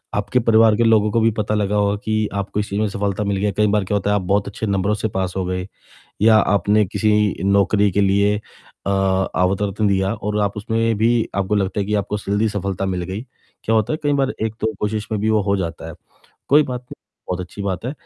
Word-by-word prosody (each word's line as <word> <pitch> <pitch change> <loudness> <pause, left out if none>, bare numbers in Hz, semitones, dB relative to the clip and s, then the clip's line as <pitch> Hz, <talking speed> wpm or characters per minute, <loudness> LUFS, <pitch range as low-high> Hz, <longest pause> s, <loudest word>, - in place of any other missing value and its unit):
आपके 105 +5 0
परिवार 115 -2 +4
के 120 - +3
लोगों 110 -2 +3
को 115 - +2
भी 115 +1 +3
पता 105 0 -1
लगा 105 -1 0
होगा 100 0 +2
कि 110 -1 0
आपको 100 +1 -3
इस 105 - -3
चीज़ 100 - -2
में 110 - +1
सफलता 100 +1 -2
मिल 100 -1 -1
गया। 105 +1 0
कई 105 0 +3
बार 105 0 +1
क्या 105 - -1
होता 100 0 0
है - - +3
कि - - -2
आप 90 - -8
बहुत 100 +1 +1
अच्छे 100 +2 -5
नंबरों 100 0 0
से 110 +1 -1
पास 95 -1 -1
हो 95 - 0
गए 90 +1 -3 0.6
या 110 0 +6
आपने 105 0 +3
किसी 105 +1 +1
नौकरी 100 +1 +3
के 100 - +1
लिए 100 +1 +3 0.5
अ - - +1
अवतरतन 95 +1 0
दिया 95 0 +1
और 105 -1 -3
आप 100 0 -1
उसमें 115 +2 0
भी 115 +1 +2
आपको 100 +1 0
लगता 100 0 0
है 100 - -2
कि 105 - -1
आपको 105 0 -1
जल्दी 105 +2 0
सफलता 100 -2 -3
मिल 90 -2 -2
गई। 95 +5 -5 0.4
क्या 115 - +1
होता 110 +5 +1
है 155 - -1
कई 145 - +1
बार 135 -1 +1
एक 110 -1 -3
तो 110 0 0
कोशिश 105 0 -2
में 105 - -1
भी 110 +1 +1
वो 110 -1 +3
हो 100 0 +1
जाता 85 -3 -4
है। 80 - -8 0.5
कोई 150 +2 +6
बात 125 -3 -5
नहीं 125 - -12 0.3
बहुत 90 0 -2
अच्छी 90 +3 -7
बात 95 -1 -3
है 125 - -2
105 Hz, 245 wpm, -20 LUFS, 100-110 Hz, 0.6 s, या